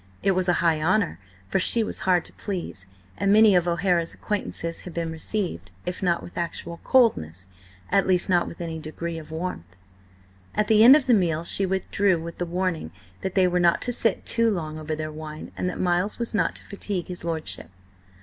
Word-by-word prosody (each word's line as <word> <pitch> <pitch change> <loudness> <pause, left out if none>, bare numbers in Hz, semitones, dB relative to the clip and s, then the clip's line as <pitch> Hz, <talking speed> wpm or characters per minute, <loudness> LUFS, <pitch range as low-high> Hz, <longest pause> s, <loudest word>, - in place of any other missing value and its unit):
It 195 - +4
was 185 -1 +1
a - - +5
high 160 -2 +3
honour, 185 +3 +1 0.3
for 190 - +1
she 225 +4 +1
was - - -3
hard 180 -2 +3
to - - -10
please, 175 - -5 0.3
and 200 - +2
many 215 0 +7
of 175 -1 +3
O'Hara's 170 -1 +1
acquaintances 170 -5 -3
had 180 - -10
been 165 -1 -2
received, 160 - -3
if 180 +2 -4
not 175 -3 +1
with 175 - -7
actual 170 0 -4
coldness, 95 - +2 0.5
at 195 - +3
least 180 -1 +2
not 175 -2 +2
with 170 - -9
any 165 -1 -4
degree 165 +2 -5
of 155 - -12
warmth. 160 - -5 0.8
At 210 - +1
the 220 0 +6
end 255 +4 +10
of 300 -3 +2
the 250 - +4
meal 170 -6 +2
she 195 +3 0
withdrew 190 -1 +1
with 170 +1 -8
the 175 - -2
warning 175 - -2 0.3
that 190 - -4
they 185 -2 +5
were 180 0 +1
not 170 -1 +4
to 245 - -1
sit 225 -4 +1
too 230 0 +3
long 155 -6 -3
over 155 0 -3
their 155 0 -4
wine, 155 0 -8
and 180 - -1
that - - -6
Miles 180 +3 +1
was 235 -1 -3
not 180 -6 +1
to - - -8
fatigue 200 -3 -3
his 180 -2 -6
lordship. 160 - -2
175 Hz, 205 wpm, -25 LUFS, 165-195 Hz, 0.8 s, end